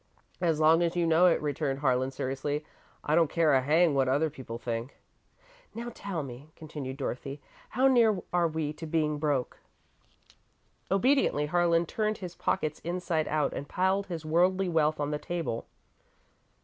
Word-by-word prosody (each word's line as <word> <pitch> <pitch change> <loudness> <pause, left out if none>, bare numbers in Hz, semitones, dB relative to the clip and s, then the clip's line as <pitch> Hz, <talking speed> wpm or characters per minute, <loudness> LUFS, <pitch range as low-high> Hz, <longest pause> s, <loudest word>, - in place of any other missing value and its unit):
"As 165 -3 +1
long 160 +2 +5
as 170 0 0
you 175 -1 +1
know 165 +2 +5
it," 170 - +3
returned 145 -2 -1
Harlan, 130 -2 +1
seriously, 135 +3 -3 0.4
"I 150 - 0
don't 165 -1 +4
care 165 -3 +3
a 130 - +4
hang 155 +4 +3
what 135 -2 +2
other 145 +4 +1
people 130 -5 -7
think." 120 +2 -5 0.8
"Now, 235 +1 -5
tell 190 -8 -4
me," 135 +3 -10
continued 145 -4 -7
Dorothy, 135 +1 -4 0.3
"how 260 +2 +3
near 230 -6 +4
are 175 -1 +3
we 155 -2 -3
to 160 +1 -8
being 155 -2 0
broke?" 145 -4 -1 1.3
Obediently, 195 - +2
Harlan 170 +1 +2
turned 215 +5 -1
his 180 -3 -7
pockets 155 -3 -1
inside 170 -2 -2
out 150 -1 0
and 140 - -6
piled 190 +2 +1
his 165 -4 -6
worldly 180 +4 +2
wealth 155 -2 +1
on 145 0 -1
the 150 - -2
table. 165 -11 -4
155 Hz, 160 wpm, -29 LUFS, 145-175 Hz, 1.3 s, long